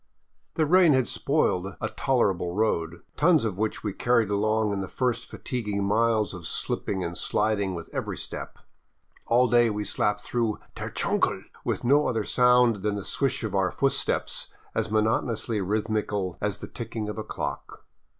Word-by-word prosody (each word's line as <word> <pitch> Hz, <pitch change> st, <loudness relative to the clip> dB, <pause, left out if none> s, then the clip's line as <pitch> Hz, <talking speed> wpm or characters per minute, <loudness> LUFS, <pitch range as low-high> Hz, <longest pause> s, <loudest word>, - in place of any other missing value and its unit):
The 155 Hz, -, +2 dB
rain 175 Hz, 0 st, +6 dB
had 130 Hz, -2 st, +2 dB
spoiled 95 Hz, -, 0 dB
a 110 Hz, -, -1 dB
tolerable 100 Hz, -9 st, 0 dB
road, 85 Hz, -6 st, 0 dB
tons 160 Hz, -4 st, +4 dB
of 100 Hz, -3 st, -3 dB
which 110 Hz, 0 st, -1 dB
we 105 Hz, -3 st, -2 dB
carried 115 Hz, -1 st, +2 dB
along 110 Hz, +1 st, +1 dB
in 100 Hz, -, -2 dB
the 95 Hz, -, -4 dB
first 120 Hz, +2 st, -1 dB
fatiguing 105 Hz, -5 st, -3 dB
miles 110 Hz, +1 st, +2 dB
of 85 Hz, -4 st, -7 dB
slipping 95 Hz, -2 st, -2 dB
and 85 Hz, +1 st, -4 dB
sliding 105 Hz, -2 st, 0 dB
with 85 Hz, -, -7 dB
every -, -, -3 dB
step. -, -, -7 dB, 0.7 s
All 125 Hz, +2 st, +4 dB
day 120 Hz, 0 st, +4 dB
we 105 Hz, -1 st, -2 dB
slapped 105 Hz, +1 st, 0 dB
through 115 Hz, -3 st, -1 dB
" -, -, -34 dB
der -, -, -4 dB
chungle -, -, 0 dB
" -, -, -23 dB
with -, -, -2 dB
no 145 Hz, +4 st, +4 dB
other 110 Hz, -3 st, 0 dB
sound 125 Hz, -1 st, +4 dB
than 105 Hz, +1 st, -1 dB
the 100 Hz, -, -4 dB
swish 135 Hz, -2 st, -1 dB
of 110 Hz, -3 st, -3 dB
our 95 Hz, -2 st, +2 dB
footsteps, 135 Hz, -1 st, 0 dB, 0.3 s
as -, -, -1 dB
monotonously 110 Hz, 0 st, 0 dB
rhythmical 105 Hz, -2 st, -1 dB
as 105 Hz, -1 st, -2 dB
the -, -, -6 dB
ticking 115 Hz, -2 st, -5 dB
of 105 Hz, +1 st, -4 dB
a -, -, -3 dB
clock. -, -, -6 dB
110 Hz, 175 wpm, -26 LUFS, 100-120 Hz, 0.7 s, rain